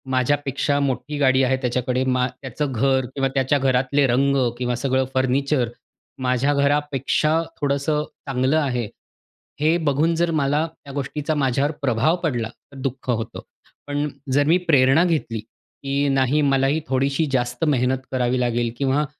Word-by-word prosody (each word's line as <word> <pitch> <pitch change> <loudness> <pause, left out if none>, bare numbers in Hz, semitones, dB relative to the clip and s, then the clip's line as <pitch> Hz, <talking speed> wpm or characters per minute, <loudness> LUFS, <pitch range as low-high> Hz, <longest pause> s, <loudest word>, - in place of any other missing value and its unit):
माझ्यापेक्षा 140 +2 0
मोठी 140 +2 -2
गाडी 130 -2 +4
आहे 130 0 +2
त्याच्याकडे, 125 0 0
मा 125 -1 +1
त्याचं 135 +2 -3
घर 130 +2 +2
किंवा 135 -1 +1
त्याच्या 135 +1 +2
घरातले 135 +2 +2
रंग 135 +3 +2 0.2
किंवा 125 0 -1
सगळं 130 +1 0
फर्निचर 130 -1 +1 0.5
माझ्या 130 +3 +1
घरापेक्षा 145 +2 +1 0.2
थोडंसं 145 +2 0 0.2
चांगलं 135 +3 +1
आहे. 125 -7 0 0.7
हे 160 +3 +3
बघून 155 +1 +1
जर 170 0 +1
मला 145 +3 +1
त्या 140 -3 -13
गोष्टीचा 145 +2 -3
माझ्यावर 140 +1 +1
प्रभाव 135 +4 +2
पडला 120 -8 -1 0.2
तर 140 - -12
दुःख 130 -1 -4
होतं. 115 -1 -2 0.5
पण 145 +1 -1 0.3
जर 145 +1 +4
मी 165 +3 +5
प्रेरणा 135 +2 +5
घेतली 150 -10 -1
की 140 +6 -4
नाही 135 +2 +2
मलाही 140 +2 +2
थोडीशी 135 +4 +1
जास्त 125 0 -1
मेहनत 130 -3 +2
करावी 125 -1 0
लागेल 120 -1 0
किंवा 140 +2 +1
135 Hz, 145 wpm, -22 LUFS, 125-145 Hz, 0.7 s, मी